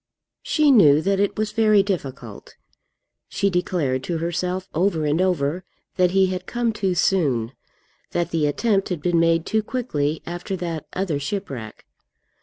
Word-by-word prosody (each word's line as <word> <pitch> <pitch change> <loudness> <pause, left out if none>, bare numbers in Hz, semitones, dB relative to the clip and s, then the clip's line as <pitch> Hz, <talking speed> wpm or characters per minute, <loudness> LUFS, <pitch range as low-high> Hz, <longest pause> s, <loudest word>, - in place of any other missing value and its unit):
She 305 -2 +3
knew 155 - +6
that 195 0 +1
it 200 0 0
was 215 0 -1
very 215 -2 +4
difficult. 135 - -6 0.7
She 200 0 0
declared 165 -7 0
to 170 - -2
herself 180 +3 -2
over 165 -2 +1
and 150 +4 +1
over 175 -2 0 0.3
that 180 -1 +3
he 190 +1 +3
had 185 0 -4
come 240 -2 -1
too 190 -3 -1
soon, 140 -11 +1 0.6
that 175 0 -2
the 160 -3 +1
attempt 195 +6 0
had 170 -5 -4
been 175 -2 +2
made 165 -1 +2
too 220 0 +1
quickly 160 - -2
after 175 +3 -4
that 170 -4 -5
other 180 -6 -1
shipwreck. 140 - -6
180 Hz, 155 wpm, -22 LUFS, 155-195 Hz, 0.7 s, knew